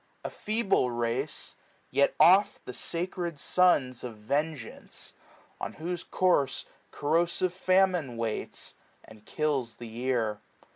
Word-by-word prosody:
A -, -, -3 dB
feeble 210 Hz, -, +1 dB
race! 120 Hz, +4 st, -2 dB, 0.4 s
yet 140 Hz, +2 st, +3 dB
oh 190 Hz, +4 st, +8 dB, 0.2 s
The 125 Hz, -, -6 dB
sacred 170 Hz, 0 st, -2 dB
sons 140 Hz, -7 st, +3 dB
of 120 Hz, -3 st, -6 dB
vengeance; 140 Hz, +3 st, -3 dB, 0.5 s
on -, -, -4 dB
whose 175 Hz, +2 st, -4 dB
courfe 175 Hz, -8 st, +1 dB, 0.2 s
Corrosive 170 Hz, +4 st, +1 dB
famine 185 Hz, -8 st, +2 dB
waits, 115 Hz, -2 st, -3 dB, 0.3 s
and 110 Hz, -1 st, -15 dB
kills 140 Hz, -7 st, -1 dB
the 120 Hz, -, -9 dB
year. 115 Hz, -2 st, -1 dB
145 Hz, 110 wpm, -29 LUFS, 120-180 Hz, 0.5 s, oh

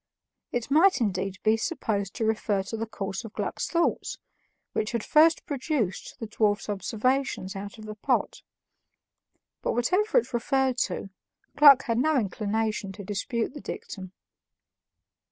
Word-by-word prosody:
It 245 Hz, +2 st, -3 dB
might 355 Hz, +5 st, +5 dB
indeed 195 Hz, -3 st, -1 dB
be 220 Hz, +1 st, +4 dB
supposed 215 Hz, -, -2 dB
to 225 Hz, -, -1 dB
refer 215 Hz, -2 st, 0 dB
to 195 Hz, -, -5 dB
the 225 Hz, +1 st, -3 dB
course 195 Hz, -1 st, -4 dB
of 225 Hz, -1 st, -9 dB
Gluck's -, -, -3 dB
thoughts, 340 Hz, 0 st, 0 dB, 0.6 s
which 215 Hz, +2 st, -1 dB
had 230 Hz, -2 st, -1 dB
first 320 Hz, +2 st, +4 dB
produced 270 Hz, -, -2 dB
the 225 Hz, -, -4 dB
dwarf's 210 Hz, -1 st, 0 dB
observations 220 Hz, 0 st, -1 dB
out 200 Hz, +2 st, -7 dB
of 215 Hz, -, -10 dB
the 215 Hz, -, -6 dB
pot; 210 Hz, -, -1 dB, 1.2 s
but -, -, 0 dB
whatever 370 Hz, -, +2 dB
it 465 Hz, -, +1 dB
referred 260 Hz, +1 st, +1 dB
to, 195 Hz, -, -5 dB, 0.4 s
Gluck 285 Hz, -3 st, +8 dB
had 230 Hz, -3 st, 0 dB
no 310 Hz, +2 st, +3 dB
inclination 210 Hz, -1 st, -1 dB
to 200 Hz, +1 st, -9 dB
dispute 225 Hz, +5 st, -2 dB
the 290 Hz, -, -8 dB
dictum. 185 Hz, -3 st, -7 dB
225 Hz, 145 wpm, -27 LUFS, 205-270 Hz, 1.2 s, Gluck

